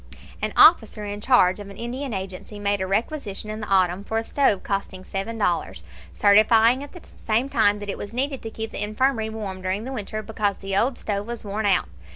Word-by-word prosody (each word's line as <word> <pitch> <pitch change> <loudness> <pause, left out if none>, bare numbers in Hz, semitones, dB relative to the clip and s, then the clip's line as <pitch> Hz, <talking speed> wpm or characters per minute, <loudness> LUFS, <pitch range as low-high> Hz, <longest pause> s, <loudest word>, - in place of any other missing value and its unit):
An - - -1
officer 220 -9 +6
in 205 0 -5
charge 210 -7 +4
of 205 -1 -8
an 200 - -11
Indian 255 +3 -4
agency 190 +1 -6
made 205 -1 0
a 190 - -1
requisition 215 0 -2
in 215 - -5
the 210 - -5
autumn 185 0 +2
for 220 +2 -3
a 225 - 0
stove 225 -6 +1
costing 195 -2 -3
seven 195 +4 -4
dollars, 175 - -1 0.3
certifying 220 - +5
at 285 - -9
the 355 - -12
same 230 +4 -1
time 210 -5 +3
that 205 0 -7
it 200 - -4
was 205 - -6
needed 270 +3 -1
to 225 - -6
keep 220 0 -5
the - - -3
infirmary 220 +1 0
warm 205 -4 -6
during 190 +3 -2
the 265 +3 -5
winter, 215 -2 -4
because 205 -2 -1
the 195 0 -4
old 240 +5 +2
stove 205 0 -3
was 235 -2 -5
worn 205 +1 -1
out. 190 -2 +2
210 Hz, 215 wpm, -24 LUFS, 200-230 Hz, 0.3 s, officer